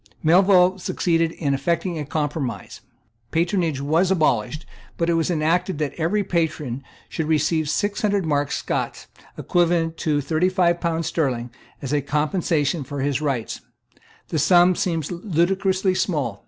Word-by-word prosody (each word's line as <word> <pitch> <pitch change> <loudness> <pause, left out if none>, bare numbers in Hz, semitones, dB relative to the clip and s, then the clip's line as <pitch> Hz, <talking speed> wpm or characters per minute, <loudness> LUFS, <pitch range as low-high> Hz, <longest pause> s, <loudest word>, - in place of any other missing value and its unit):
Melville 185 +2 +5
succeeded 165 -2 0
in 140 -4 -1
effecting 170 +4 -1
a 150 - -4
compromise. 145 -3 -4 0.5
Patronage 170 -2 0
was 160 +6 +2
abolished; 155 - 0 0.3
but 170 0 +1
it - - +2
was 165 0 +1
enacted 165 +1 0
that 150 -2 -2
every 175 +6 0
patron 155 -8 -2 0.2
should 160 -2 -3
receive 155 0 +1
six 205 +5 -1
hundred 205 -3 +1
marks 145 -2 0
Scots, - - -3 0.3
equivalent 170 -2 +1
to 155 - -1
about 145 - 0
thirty 160 +6 +1
five 175 -2 +1
pounds 165 -1 -1
sterling, 125 -8 -1 0.3
as 135 +1 -3
a 145 - +2
compensation 150 +1 0
for 140 +1 -5
his 140 0 0
rights. 135 -7 -2 0.7
The 160 - -1
sum 175 +4 +5
seems 165 -4 -2
ludicrously 185 +2 0
small. 160 - -1
165 Hz, 145 wpm, -22 LUFS, 145-180 Hz, 0.7 s, Melville